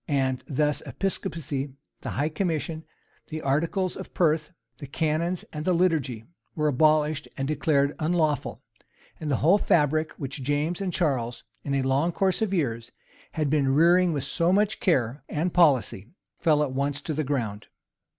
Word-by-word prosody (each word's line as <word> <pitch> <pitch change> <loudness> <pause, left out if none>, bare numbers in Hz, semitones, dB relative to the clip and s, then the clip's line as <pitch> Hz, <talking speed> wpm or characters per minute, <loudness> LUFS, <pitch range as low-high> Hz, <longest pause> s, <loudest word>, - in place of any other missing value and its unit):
And 130 -3 0
thus 150 +1 0
episcopacy, 145 -7 -3 0.3
the - - -6
high 145 +3 -1
commission, 160 -2 -2 0.4
the 155 0 -6
articles 170 +7 0
of - - -9
Perth, 155 -2 +1 0.3
the 140 - -7
canons, 165 +4 -1
and 150 -1 -4
the 185 - +2
liturgy, 150 -10 0 0.3
were 150 -1 +1
abolished 150 +1 +2
and 135 -1 -2
declared 145 -1 +1
unlawful; 155 -2 0 0.6
and 155 - -4
the 140 - +2
whole 190 +6 +6
fabric 155 -2 +2
which 135 0 -6
Jamas 145 +7 -1
and 190 -2 -1
Charles, 130 -9 -1 0.2
in 140 - -1
a 135 - +1
long 135 +6 +1
course 190 +3 0
of 220 -3 0
years, 115 -11 -1 0.4
had 150 -3 -1
been 135 -3 +2
rearing 175 +3 +5
with 145 -4 -2
so 170 +5 +1
much 210 +2 +2
care 135 - +1
and 165 +4 -1
policy, 130 - +3 0.3
fell 150 -3 +3
at 140 - -2
once 140 +2 -1
to 155 - -3
the 155 +1 -1
ground. 115 -7 -3
150 Hz, 160 wpm, -26 LUFS, 140-165 Hz, 0.6 s, whole